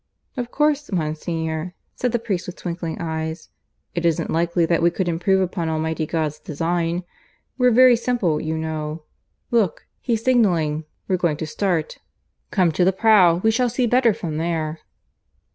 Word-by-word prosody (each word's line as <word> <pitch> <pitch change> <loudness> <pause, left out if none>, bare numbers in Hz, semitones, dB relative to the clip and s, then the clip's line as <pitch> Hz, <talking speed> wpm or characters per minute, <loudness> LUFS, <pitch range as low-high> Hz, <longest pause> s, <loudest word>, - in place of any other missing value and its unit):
"Of 245 -3 -3
course, 295 0 +1
Monsignor," 160 0 -3 0.2
said 250 - -1
the 240 - +1
priest, 205 -6 -3
with 180 - -6
twinkling 170 -2 -5
eyes, 160 -1 -4 0.4
"it 170 - -2
isn't 170 -2 +1
likely 170 +1 +1
that 165 0 +1
we 170 - +5
could 180 +1 -2
improve 175 +3 +2
upon 175 -3 -2
Almighty 160 0 -1
God's 155 -2 -2
design. 165 +3 -2 0.6
We're 250 0 +5
very 250 +1 +7
simple, 225 -10 0
you 160 0 -2
know.... 155 0 -4 0.5
Look, 220 -8 +1
he's 230 -3 -1
signalling. 170 -11 +2 0.2
We're 185 - +1
going 170 -4 0
to 160 - -3
start. 165 -1 -1 0.5
Come 180 -4 +2
to 180 - +1
the 185 - +4
prow. 190 -4 +4
We 220 - +4
shall 245 +2 +1
see 245 +2 0
better 245 0 +4
from 165 -6 -4
there." 160 -1 -2
170 Hz, 160 wpm, -22 LUFS, 160-215 Hz, 0.6 s, very